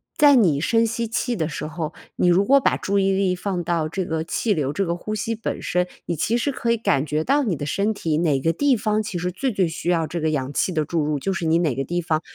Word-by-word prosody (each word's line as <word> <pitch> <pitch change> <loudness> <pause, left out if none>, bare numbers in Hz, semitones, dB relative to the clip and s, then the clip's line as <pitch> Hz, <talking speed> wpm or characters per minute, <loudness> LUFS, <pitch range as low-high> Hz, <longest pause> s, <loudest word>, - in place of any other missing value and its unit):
在 290 -2 +6
你 170 - +3
深 230 +7 +3
吸 230 +1 -2
气 245 +1 -1
的 160 -6 -1
时 150 - -5
候， 155 0 -4 0.2
你 - - +2
如 185 +3 +4
果 275 +5 +6
把 - - +2
注 200 +1 0
意 195 0 +2
力 190 -1 +1
放 180 -1 -3
到 165 -2 -1
这 180 +3 -3
个 160 -1 -2
气 210 +6 0
流、 145 -6 -1
这 195 +6 -1
个 170 0 -1
呼 215 +5 -5
吸 225 +2 -2
本 220 - -4
身， 180 0 0 0.2
你 170 - -2
其 225 +9 0
实， 280 +4 0
可 235 -2 -1
以 235 - +2
感 195 -10 +1
觉 150 +1 -1
到 285 - +2
你 205 -9 0
的 145 - -4
身 200 +8 0
体 160 -7 -1
哪 155 -5 +2
个 165 +5 +1
地 280 +1 +2
方 215 -1 0
其 205 -4 -4
实 180 +1 -2
最 260 +9 -2
最 195 -4 +1
需 165 +1 -4
要 165 -2 +2
这 170 0 -4
个 160 - +1
氧 140 -2 -2
气 185 - 0
的 155 -3 0
注 165 0 -1
入， 150 0 0
就 195 +7 -1
是 185 -3 -3
你 160 +1 +3
哪 160 -7 +1
个 135 - -1
地 175 +4 -2
方 160 -2 0
175 Hz, 305 characters per minute, -22 LUFS, 160-215 Hz, 0.2 s, 在